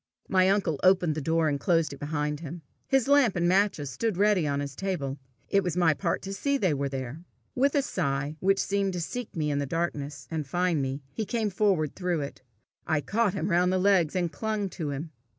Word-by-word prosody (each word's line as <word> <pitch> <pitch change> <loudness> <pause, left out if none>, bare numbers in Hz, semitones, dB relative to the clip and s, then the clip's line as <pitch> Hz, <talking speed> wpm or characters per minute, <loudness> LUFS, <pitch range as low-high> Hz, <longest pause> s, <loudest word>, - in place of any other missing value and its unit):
My 185 -1 +4
uncle 190 -7 +1
opened 185 -3 +4
the 155 - -3
door, 160 +2 +2
and 145 -2 0
closed 165 -1 +1
it 140 - -10
behind 150 0 -2
him. 165 +1 -8 0.2
His 270 -1 +2
lamp 280 -7 +4
and 175 -1 +1
matches 185 -7 +2
stood 220 - -1
ready 200 -5 +3
on 140 0 0
his 140 -2 -4
table: 150 -8 -3 0.3
it 200 - +3
was 180 -1 -2
my 170 -3 +4
part 170 +3 -2
to 195 0 -5
see 280 +8 0
they 185 - +1
were 140 0 -1
there. 135 +4 -5 0.3
With 275 +3 +2
a 280 - +3
sigh, 140 - -2
which 195 +1 +3
seemed 195 -1 0
to 180 - -3
seek 245 +8 -5
me 150 -3 0
in 140 - 0
the 140 - -2
darkness 150 -2 -3
and 155 -3 -3
find 175 0 +1
me, 135 +1 -3
he 220 - -2
came 220 -1 -1
forward 185 -7 +1
through 180 -4 -1
it. 140 -1 -6 0.5
I 155 - +2
caught 210 +3 0
him 170 +5 -1
round 180 +1 +3
the 185 - +2
legs, 185 -4 +3
and 175 -3 0
clung 210 +5 -2
to 160 -5 -4
him. 145 +3 -5
175 Hz, 220 wpm, -28 LUFS, 150-195 Hz, 0.5 s, My